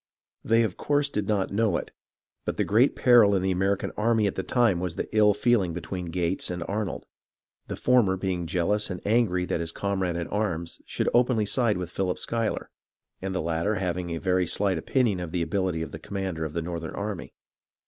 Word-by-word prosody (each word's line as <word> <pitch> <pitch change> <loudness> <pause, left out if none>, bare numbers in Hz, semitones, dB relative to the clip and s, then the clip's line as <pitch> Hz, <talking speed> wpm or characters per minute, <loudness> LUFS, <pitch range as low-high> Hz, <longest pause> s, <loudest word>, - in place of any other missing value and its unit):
They 115 +1 +3
of 105 -5 -2
course 145 -1 +1
did 105 -2 -2
not 100 -3 0
know 110 0 +2
it, - - -6 0.5
but - - -3
the - - +2
great 115 +7 +3
peril 115 -5 +6
in 95 - 0
the 95 - +1
American 95 +2 0
army 110 0 +2
at 100 - 0
the - - -2
time 115 -3 +2
was 90 -2 -3
the - - -3
ill 105 -2 +5
feeling 105 -6 +2
between 90 +1 -5
Gates 85 +2 -1
and 90 -1 -3
Arnold; 105 -1 -3 0.6
the - - -4
former 115 -7 +3
being 90 -3 -2
jealous 95 +4 0
and 90 -2 -4
angry 105 -5 +2
that 85 - -1
his 85 0 -2
comrade 95 -3 -1
in 85 0 -2
arms 85 -6 -2
should - - -2
openly 120 -3 +3
side 115 -1 +1
with 90 -1 -5
Philip 90 -1 -1
Schuyler, 115 -1 -2 0.5
and 95 0 -3
the - - -1
latter 85 +6 0
having 90 -2 -2
a 85 - -2
very 90 0 +1
slight 95 -1 +1
opinion 115 -2 +1
of 90 -2 -4
the 85 0 -1
ability 85 -1 -1
of 80 - -7
the 80 - -7
commander 95 -3 -4
of 75 - -5
the 85 0 -2
northern 85 -1 -5
army. 100 -3 -5
95 Hz, 205 wpm, -26 LUFS, 90-105 Hz, 0.6 s, peril